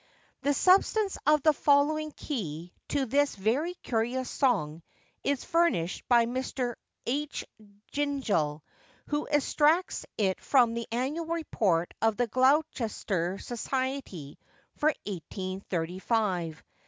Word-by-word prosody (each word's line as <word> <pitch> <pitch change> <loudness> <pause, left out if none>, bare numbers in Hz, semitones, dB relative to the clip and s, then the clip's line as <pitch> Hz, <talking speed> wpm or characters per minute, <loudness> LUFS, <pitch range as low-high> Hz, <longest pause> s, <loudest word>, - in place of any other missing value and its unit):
The 285 0 +1
substance 390 +3 +3
of 300 -2 +5
the 310 - +6
following 300 +2 +2
key 175 - -5
to 280 -2 0
this 285 +3 +2
very 255 - 0
curious 245 +2 -1
song 170 - +1 0.4
is 280 -2 -1
furnished 330 - +1
by 235 -2 +6
Mr. 250 0 -2 0.3
H. 290 +4 -2 0.5
Gingell, 225 - 0 0.5
who 295 0 -1
extracts 305 +4 +2
it 190 -3 0
from 245 -4 +4
the 235 0 -4
Annual 275 +8 -2
Report 215 - 0
of 225 -1 +2
the 245 - +2
Gloucestershire 230 - +1
Society 250 - -4 0.4
for 300 - +1 0.2
1835. 185 -1 -2
250 Hz, 105 wpm, -29 LUFS, 190-290 Hz, 0.5 s, the